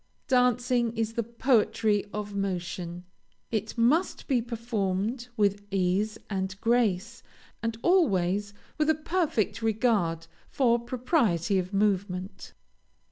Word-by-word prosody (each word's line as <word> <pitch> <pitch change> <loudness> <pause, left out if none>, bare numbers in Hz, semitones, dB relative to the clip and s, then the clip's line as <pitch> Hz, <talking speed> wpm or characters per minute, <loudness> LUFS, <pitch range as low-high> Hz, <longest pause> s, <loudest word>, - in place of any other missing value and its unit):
Dancing 245 -2 +2
is 225 0 -1
the 235 - 0
poetry 225 -3 +1
of 210 -1 -5
motion. 180 -3 -3 0.5
It 220 +1 -2
must 280 +11 +2
be 255 -4 +2
performed 230 0 -2
with 205 -1 +2
ease 195 +3 0
and 190 -1 -3
grace, 230 -1 +1 0.4
and 230 -1 -2
always 205 - +2 0.3
with 305 0 +2
a 315 - +4
perfect 305 - -1
regard 210 -8 +1 0.2
for 240 -3 +2
propriety 235 - +1
of 185 +1 -4
movement. 195 -2 -1
220 Hz, 110 wpm, -28 LUFS, 195-240 Hz, 0.5 s, a